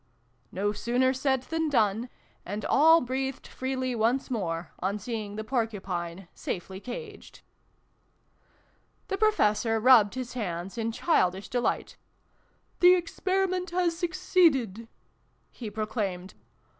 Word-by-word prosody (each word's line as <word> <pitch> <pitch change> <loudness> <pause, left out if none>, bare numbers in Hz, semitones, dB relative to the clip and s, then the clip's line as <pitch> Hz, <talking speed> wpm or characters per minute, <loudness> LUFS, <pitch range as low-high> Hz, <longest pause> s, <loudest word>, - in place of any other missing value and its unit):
" 125 -1 -41
No 205 +2 0
sooner 245 +5 +1
said 265 -1 0
than 325 +2 -1
done: 225 -2 +1 0.3
and 205 +3 -5
all 325 +3 +6
breathed 265 +1 -3
freely 260 -1 -3
once 240 +4 0
more, 170 -7 -3
on 195 +3 -1
seeing 210 -1 -5
the 215 - -4
Porcupine 195 -7 -3
safely 190 +1 -5
caged. 420 - -9 1.7
The 390 - -1
Professor 225 - +2
rubbed 230 -3 +6
his 255 -1 -5
hands 185 -5 -4
in 230 -1 -2
childish 190 - +1
delight. 245 -1 -1 0.4
" - - -40
The 360 +1 +8
Experiment 370 +1 -1
has 350 -1 +1
succeeded! 330 - +1 0.3
" - - -42 0.3
he 230 -4 -7
proclaimed. 205 -4 -3
235 Hz, 120 wpm, -28 LUFS, 205-280 Hz, 1.7 s, The